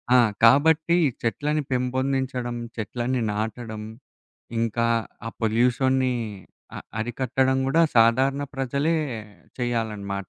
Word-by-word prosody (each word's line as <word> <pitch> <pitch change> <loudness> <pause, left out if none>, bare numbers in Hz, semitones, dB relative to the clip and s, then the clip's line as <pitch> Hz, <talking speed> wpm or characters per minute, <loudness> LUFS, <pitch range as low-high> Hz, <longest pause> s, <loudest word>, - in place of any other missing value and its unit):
ఆ! - - +8 0.3
కాబట్టి 160 +7 +5 0.3
చెట్లని 150 +6 0
పెంపొందించడం, 130 -1 -1 0.2
చెట్లని 120 +3 -2
నాటడం. 110 0 -4 0.8
ఇంకా 115 +1 0 0.4
ఆ - - -2
పొల్యూషన్‌ని 125 +3 +2 0.6
అ - - -4 0.2
అరికట్టడం 130 +3 0
కూడా 160 +5 +3 0.2
సాధారణ 130 +5 +4
ప్రజలే 140 +5 0 0.6
చేయాలనమాట. 105 -6 -3
125 Hz, 90 wpm, -24 LUFS, 115-135 Hz, 0.8 s, ఆ